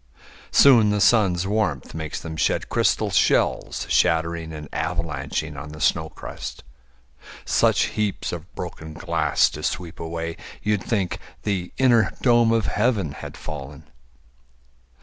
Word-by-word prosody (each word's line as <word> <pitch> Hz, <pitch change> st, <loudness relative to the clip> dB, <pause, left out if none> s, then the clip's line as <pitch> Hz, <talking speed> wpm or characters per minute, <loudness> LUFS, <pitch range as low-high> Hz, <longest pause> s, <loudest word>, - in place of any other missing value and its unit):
Soon 120 Hz, -6 st, +6 dB
the 105 Hz, 0 st, +1 dB
sun's 95 Hz, -4 st, +3 dB
warmth 95 Hz, -9 st, -1 dB
makes 80 Hz, -1 st, -4 dB
them 80 Hz, -1 st, -7 dB
shed -, -, 0 dB
crystal -, -, +1 dB
shells -, -, +1 dB
Shattering 80 Hz, +1 st, +1 dB
and 75 Hz, -1 st, -7 dB
avalanching 75 Hz, -2 st, -3 dB
on 75 Hz, +2 st, -7 dB
the 75 Hz, -, -10 dB
snow 80 Hz, 0 st, +1 dB
crust -, -, -8 dB, 0.8 s
Such -, -, +3 dB
heaps 105 Hz, -2 st, -1 dB
of 85 Hz, +1 st, -7 dB
broken 80 Hz, -3 st, -7 dB
glass 80 Hz, -3 st, +2 dB
to 75 Hz, -, -7 dB
sweep 85 Hz, +1 st, -3 dB
away 85 Hz, 0 st, -4 dB, 0.3 s
You'd 105 Hz, -1 st, +1 dB
think 95 Hz, -4 st, -1 dB, 0.2 s
the 95 Hz, -4 st, -2 dB
inner 120 Hz, -4 st, +4 dB
dome 120 Hz, -2 st, +5 dB
of 115 Hz, -1 st, +2 dB
heaven 105 Hz, -, +1 dB
had -, -, -9 dB
fallen. 75 Hz, -2 st, -8 dB
85 Hz, 130 wpm, -23 LUFS, 80-105 Hz, 0.8 s, Soon